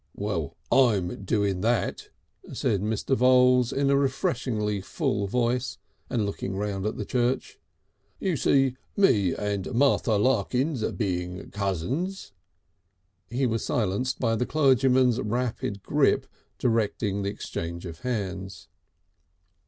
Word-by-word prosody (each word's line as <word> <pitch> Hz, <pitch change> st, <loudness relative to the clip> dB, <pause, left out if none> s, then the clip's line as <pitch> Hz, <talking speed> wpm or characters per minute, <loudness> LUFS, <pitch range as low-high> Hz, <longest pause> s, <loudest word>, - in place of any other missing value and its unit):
"Well, 85 Hz, -6 st, -3 dB
I'm 100 Hz, -7 st, +2 dB
doing 100 Hz, -3 st, 0 dB
that," 115 Hz, +3 st, 0 dB, 0.4 s
said 100 Hz, -4 st, 0 dB
Mr. 110 Hz, +5 st, 0 dB
Voules 125 Hz, -1 st, +5 dB
in 140 Hz, 0 st, +1 dB
a -, -, +4 dB
refreshingly 130 Hz, -, 0 dB
full 100 Hz, +1 st, -1 dB
voice 125 Hz, +3 st, 0 dB, 0.3 s
and 115 Hz, -5 st, 0 dB
looking 95 Hz, -1 st, -4 dB
round 100 Hz, -1 st, -2 dB
the 110 Hz, -, -2 dB
church. 125 Hz, 0 st, -1 dB, 0.6 s
"You 185 Hz, -4 st, 0 dB
see, 135 Hz, -2 st, +2 dB, 0.2 s
me 105 Hz, -, +3 dB
and 100 Hz, -1 st, -3 dB
Martha 130 Hz, -3 st, +3 dB
Larkins 125 Hz, +4 st, +1 dB
being 90 Hz, -3 st, -3 dB
cousins 100 Hz, -, -2 dB, 0.5 s
" 90 Hz, 0 st, -47 dB, 0.2 s
He 130 Hz, +3 st, 0 dB
was 115 Hz, -2 st, 0 dB
silenced 115 Hz, +4 st, -1 dB
by 115 Hz, -3 st, +1 dB
the 125 Hz, +3 st, -1 dB
clergyman's 130 Hz, -4 st, +3 dB
rapid 110 Hz, -3 st, -2 dB
grip -, -, +2 dB, 0.3 s
directing 105 Hz, -3 st, 0 dB
the 100 Hz, -, -1 dB
exchange 85 Hz, -3 st, -5 dB
of 85 Hz, -1 st, -8 dB
hands. 95 Hz, -7 st, -4 dB
110 Hz, 120 wpm, -26 LUFS, 100-125 Hz, 0.6 s, Voules